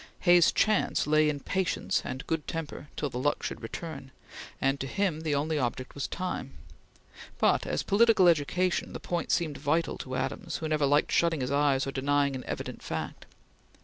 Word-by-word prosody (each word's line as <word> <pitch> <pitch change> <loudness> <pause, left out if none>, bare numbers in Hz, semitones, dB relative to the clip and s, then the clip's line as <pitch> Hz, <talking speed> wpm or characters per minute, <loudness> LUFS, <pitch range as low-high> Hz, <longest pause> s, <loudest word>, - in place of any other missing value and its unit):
Hay's 175 -2 +6
chance 215 -2 +2
lay 155 0 +4
in 145 -1 -2
patience 185 +3 0
and 130 +1 -5
good 160 -2 -2
temper 160 -2 -5
till 145 -3 -2
the 125 - -4
luck 145 +3 0
should - - -4
turn, 155 -5 -7 0.5
and 135 0 +1
to 135 - -3
him 180 -1 -1
the 155 -2 0
only 150 +2 0
object 130 0 -3
was 140 - -3
time; 185 0 -4 0.8
but - - +2
as - - -1
political 215 -2 +5
education 170 +3 +1
the - - -5
point 175 -1 -2
seemed 155 -5 0
vital 165 +4 0
to 130 -1 -5
Adams, - - -3
who 160 - -4
never 155 -2 +1
liked 145 +2 +2
shutting 165 -4 +2
his 125 - -2
eyes 140 -2 +2
or 135 - -3
denying 140 +1 +1
an 130 - -5
evident - - -5
fact. - - -5
150 Hz, 180 wpm, -29 LUFS, 140-170 Hz, 0.8 s, Hay's